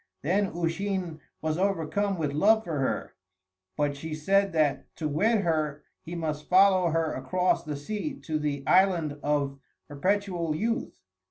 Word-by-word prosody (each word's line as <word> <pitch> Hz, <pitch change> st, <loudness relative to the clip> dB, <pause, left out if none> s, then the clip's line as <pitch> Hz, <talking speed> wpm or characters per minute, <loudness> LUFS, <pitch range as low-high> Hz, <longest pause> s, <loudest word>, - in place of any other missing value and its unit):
Then 195 Hz, +7 st, +2 dB
Usheen 175 Hz, 0 st, -2 dB, 0.2 s
was 160 Hz, +1 st, -1 dB
overcome 195 Hz, +1 st, 0 dB
with 150 Hz, -3 st, -1 dB
love 220 Hz, +8 st, +4 dB
for 160 Hz, -6 st, -3 dB
her, 130 Hz, -, -2 dB, 0.6 s
but 145 Hz, -1 st, 0 dB
she 155 Hz, +2 st, -5 dB
said 195 Hz, +5 st, +2 dB
that 150 Hz, -3 st, +1 dB
to 155 Hz, -, -2 dB
wed 205 Hz, +9 st, +2 dB
her 155 Hz, -4 st, -1 dB, 0.2 s
he 170 Hz, -, -7 dB
must 155 Hz, -3 st, -4 dB
follow 185 Hz, -1 st, +5 dB
her 165 Hz, 0 st, 0 dB
across 185 Hz, 0 st, 0 dB
the 150 Hz, -2 st, -4 dB
sea 215 Hz, -, -4 dB
to 155 Hz, -2 st, -2 dB
the 145 Hz, -2 st, -2 dB
Island 175 Hz, -6 st, +3 dB
of 140 Hz, -2 st, 0 dB, 0.3 s
Perpetual 175 Hz, +1 st, -1 dB
Youth. 225 Hz, +8 st, -2 dB
165 Hz, 150 wpm, -27 LUFS, 150-195 Hz, 0.6 s, follow